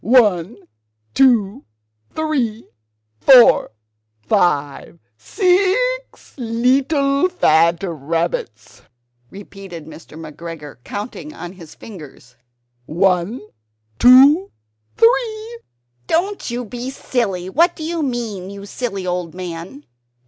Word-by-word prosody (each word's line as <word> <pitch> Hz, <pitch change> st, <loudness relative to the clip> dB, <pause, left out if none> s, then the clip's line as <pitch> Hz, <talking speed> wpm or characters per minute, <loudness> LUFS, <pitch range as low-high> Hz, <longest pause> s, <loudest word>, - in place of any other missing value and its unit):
"One, 210 Hz, -4 st, +3 dB, 0.6 s
two, 245 Hz, -2 st, +2 dB, 0.5 s
three, 260 Hz, -8 st, -2 dB, 0.5 s
four, 260 Hz, -1 st, +6 dB, 0.5 s
five, 145 Hz, +4 st, 0 dB, 0.2 s
six 400 Hz, -, 0 dB
leetle 275 Hz, +6 st, +1 dB
fat 170 Hz, -, +2 dB
rabbits!" 160 Hz, -, -4 dB, 0.5 s
repeated 195 Hz, -4 st, -11 dB
Mr. 160 Hz, 0 st, -13 dB
McGregor, 160 Hz, -1 st, -9 dB
counting 240 Hz, +9 st, -7 dB
on 175 Hz, -, -8 dB
his 170 Hz, -5 st, -14 dB
fingers 150 Hz, -, -13 dB, 0.5 s
"one, 185 Hz, +6 st, 0 dB, 0.6 s
two, 275 Hz, +9 st, +7 dB, 0.5 s
three 460 Hz, -1 st, +1 dB, 0.2 s
" 120 Hz, 0 st, -45 dB
"Don't 390 Hz, +2 st, -1 dB
you 240 Hz, +1 st, -4 dB
be 245 Hz, +4 st, -6 dB
silly: 205 Hz, -9 st, -3 dB
what 330 Hz, -, +2 dB
do 315 Hz, -, -8 dB
you 330 Hz, +1 st, -3 dB
mean, 230 Hz, -9 st, -4 dB
you 200 Hz, 0 st, -9 dB
silly 200 Hz, -3 st, -5 dB
old 180 Hz, -2 st, -3 dB
man?" 180 Hz, -, -8 dB
215 Hz, 95 wpm, -19 LUFS, 170-275 Hz, 0.6 s, two